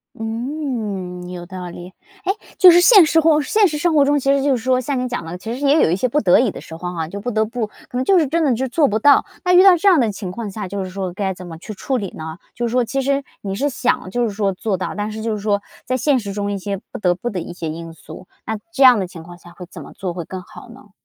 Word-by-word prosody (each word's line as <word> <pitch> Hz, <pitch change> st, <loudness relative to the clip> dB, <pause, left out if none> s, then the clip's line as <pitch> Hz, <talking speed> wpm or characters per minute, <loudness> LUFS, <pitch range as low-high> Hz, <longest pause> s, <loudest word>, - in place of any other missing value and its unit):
嗯， 225 Hz, -7 st, -4 dB
有 180 Hz, -1 st, -7 dB
道 180 Hz, 0 st, -7 dB
理， 175 Hz, +1 st, -9 dB
诶， -, -, -25 dB, 0.6 s
就 365 Hz, -2 st, +9 dB
是 345 Hz, -, +6 dB
现 385 Hz, 0 st, +7 dB
实 325 Hz, +1 st, +3 dB
或 310 Hz, -1 st, +4 dB
现 415 Hz, +8 st, +3 dB
实 305 Hz, -3 st, -3 dB
生 335 Hz, +2 st, +1 dB
活 290 Hz, -2 st, +5 dB
中 290 Hz, +1 st, +2 dB
其 275 Hz, 0 st, +1 dB
实 280 Hz, -, +1 dB
就 275 Hz, -1 st, +2 dB
是 230 Hz, -, -5 dB
说 255 Hz, -1 st, +2 dB
像 265 Hz, +2 st, -2 dB
你 255 Hz, 0 st, -1 dB
讲 245 Hz, -9 st, -4 dB
的， 170 Hz, +2 st, -6 dB
其 220 Hz, +5 st, -6 dB
实 250 Hz, -, -6 dB
也 290 Hz, +3 st, +4 dB
有 -, -, +2 dB
一 -, -, +2 dB
些 225 Hz, +7 st, 0 dB
不 290 Hz, +5 st, 0 dB
得 180 Hz, -4 st, +5 dB
已 245 Hz, -1 st, +2 dB
的 -, -, -9 dB
时 -, -, -12 dB
候 180 Hz, +2 st, -5 dB
哈， 165 Hz, -2 st, -3 dB
就 200 Hz, +5 st, -7 dB
不 245 Hz, +5 st, -3 dB
得 220 Hz, -1 st, +1 dB
不 225 Hz, -1 st, -4 dB, 0.4 s
就 385 Hz, -, +4 dB
是 325 Hz, -, +4 dB
真 330 Hz, +5 st, 0 dB
的 280 Hz, -5 st, +3 dB
就 265 Hz, +3 st, -2 dB
做 285 Hz, +3 st, +3 dB
不 215 Hz, -, 0 dB
到， 280 Hz, +6 st, +5 dB, 0.2 s
那 360 Hz, -, +2 dB
遇 360 Hz, -, +8 dB
到 380 Hz, -1 st, +8 dB
这 350 Hz, +4 st, +3 dB
样 355 Hz, -5 st, +5 dB
的 235 Hz, -4 st, +2 dB
情 195 Hz, -2 st, -6 dB
况 220 Hz, +2 st, -5 dB
下 200 Hz, 0 st, -6 dB
就 200 Hz, 0 st, -3 dB
是 -, -, -7 dB
说 185 Hz, -1 st, -4 dB
该 190 Hz, 0 st, -2 dB
怎 180 Hz, 0 st, -11 dB
么 165 Hz, -2 st, -8 dB
去 200 Hz, +6 st, -8 dB
处 260 Hz, +6 st, -2 dB
理 200 Hz, -5 st, -4 dB
呢？ 160 Hz, +1 st, -7 dB, 0.2 s
就 240 Hz, -, -2 dB
是 -, -, -4 dB
说 250 Hz, 0 st, +2 dB
其 270 Hz, +4 st, -2 dB
实 275 Hz, +1 st, 0 dB, 0.2 s
你 195 Hz, -1 st, -4 dB
是 275 Hz, +8 st, 0 dB
想 245 Hz, -7 st, -1 dB
就 240 Hz, +5 st, -1 dB
是 230 Hz, -, 0 dB
说 200 Hz, -1 st, -1 dB
做 195 Hz, +1 st, -2 dB
到， 185 Hz, -, -4 dB
但 210 Hz, +1 st, -3 dB
是 220 Hz, +1 st, -6 dB
就 225 Hz, 0 st, -1 dB
是 -, -, -5 dB
说 205 Hz, -1 st, +1 dB, 0.2 s
在 255 Hz, 0 st, -1 dB
现 270 Hz, +2 st, +2 dB
实 205 Hz, -5 st, -4 dB
中 200 Hz, 0 st, -3 dB
一 200 Hz, -, -2 dB
些 195 Hz, 0 st, -4 dB
不 -, -, -6 dB
得 180 Hz, -4 st, +2 dB
不 240 Hz, +7 st, -4 dB
的 190 Hz, -6 st, -4 dB
一 -, -, -7 dB
些 170 Hz, -2 st, -6 dB
因 165 Hz, +1 st, -7 dB
素， 180 Hz, +2 st, -12 dB, 0.2 s
那 220 Hz, -, -3 dB
这 275 Hz, -5 st, +2 dB
样 250 Hz, -4 st, +8 dB
的 190 Hz, -, -2 dB
情 170 Hz, -2 st, -11 dB
况 175 Hz, +1 st, -12 dB
下 175 Hz, 0 st, -16 dB
会 180 Hz, +1 st, -10 dB
怎 -, -, -10 dB
么 -, -, -12 dB
做 185 Hz, -3 st, -5 dB
会 170 Hz, -1 st, -5 dB
更 185 Hz, +3 st, -7 dB
好 180 Hz, -, -14 dB
呢？ 240 Hz, -3 st, -16 dB
220 Hz, 330 characters per minute, -19 LUFS, 185-270 Hz, 0.6 s, 就